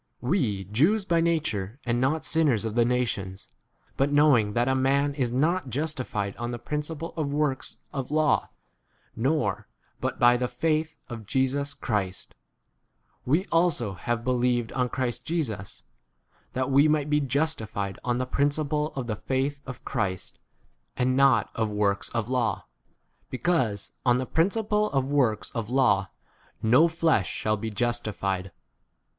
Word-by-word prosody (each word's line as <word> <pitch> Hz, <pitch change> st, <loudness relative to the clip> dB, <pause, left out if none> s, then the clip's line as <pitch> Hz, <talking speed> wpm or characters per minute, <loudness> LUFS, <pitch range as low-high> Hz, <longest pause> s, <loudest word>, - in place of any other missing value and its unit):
We, 120 Hz, -, 0 dB
Jews 155 Hz, -, +2 dB
by 170 Hz, -3 st, +2 dB
nature, 135 Hz, -, -1 dB
and 120 Hz, 0 st, +1 dB
5 -, -, 0 dB
not 150 Hz, +5 st, +1 dB
sinners 145 Hz, -10 st, +2 dB
of 110 Hz, -, -2 dB
[the] 120 Hz, 0 st, +3 dB
nations, 110 Hz, -6 st, -2 dB, 0.5 s
but 135 Hz, -, +3 dB
7 145 Hz, 0 st, -1 dB
knowing 130 Hz, -9 st, +4 dB
that 120 Hz, +2 st, +1 dB
a 130 Hz, -, +3 dB
man 140 Hz, +2 st, +2 dB
is 130 Hz, -4 st, -1 dB
not 155 Hz, +4 st, +1 dB
justi 150 Hz, +1 st, -1 dB
fied 100 Hz, -4 st, -3 dB
on 120 Hz, 0 st, -3 dB
the 120 Hz, -, -3 dB
principle 150 Hz, +5 st, -4 dB
of 150 Hz, -3 st, -2 dB
works 145 Hz, -2 st, -1 dB, 0.2 s
of 135 Hz, -2 st, -4 dB
law 155 Hz, 0 st, +2 dB, 0.7 s
[nor 140 Hz, +7 st, +1 dB
a -, -, -16 dB, 0.2 s
] -, -, -37 dB
but -, -, -2 dB
by 120 Hz, 0 st, +6 dB
the 125 Hz, 0 st, -1 dB
faith 155 Hz, +5 st, -1 dB
of 115 Hz, -4 st, -8 dB
Jesus 135 Hz, +3 st, 0 dB
Christ, 95 Hz, -5 st, -3 dB, 0.9 s
we 160 Hz, +9 st, +2 dB
also 165 Hz, -, +2 dB
have 115 Hz, +6 st, -3 dB
be 130 Hz, -, +1 dB
lieved 120 Hz, -2 st, +1 dB
on 125 Hz, -1 st, +1 dB
Christ 125 Hz, -1 st, -2 dB
Jesus, 130 Hz, -, -3 dB, 0.7 s
that 130 Hz, +1 st, -1 dB
we 140 Hz, +3 st, +6 dB
might 150 Hz, -1 st, +1 dB
be 150 Hz, 0 st, +2 dB
justified 125 Hz, -8 st, -2 dB
on 120 Hz, -1 st, 0 dB
the 130 Hz, -, -1 dB
principle 150 Hz, +3 st, 0 dB
of 135 Hz, -2 st, -3 dB
[the] 110 Hz, -2 st, -2 dB
faith 135 Hz, +5 st, -2 dB
of 135 Hz, -, -8 dB
Christ, 100 Hz, -8 st, -3 dB, 0.6 s
and 130 Hz, +1 st, +2 dB
not 130 Hz, -5 st, +4 dB
of 110 Hz, -1 st, -1 dB
works 105 Hz, -1 st, 0 dB
of 115 Hz, -2 st, -2 dB
law; 120 Hz, -6 st, 0 dB, 0.6 s
because 130 Hz, -, 0 dB
on 125 Hz, -1 st, +4 dB
the 130 Hz, -, -2 dB
principle 210 Hz, -, +1 dB
of 135 Hz, -1 st, +2 dB
works 125 Hz, -8 st, +1 dB
of 115 Hz, -3 st, -4 dB
law 120 Hz, -8 st, +3 dB, 0.5 s
no 125 Hz, +9 st, +5 dB
flesh: 160 Hz, -, +1 dB
shall 110 Hz, 0 st, 0 dB
be 110 Hz, +1 st, -4 dB
justified. 105 Hz, -5 st, -2 dB
130 Hz, 160 wpm, -26 LUFS, 115-150 Hz, 0.9 s, by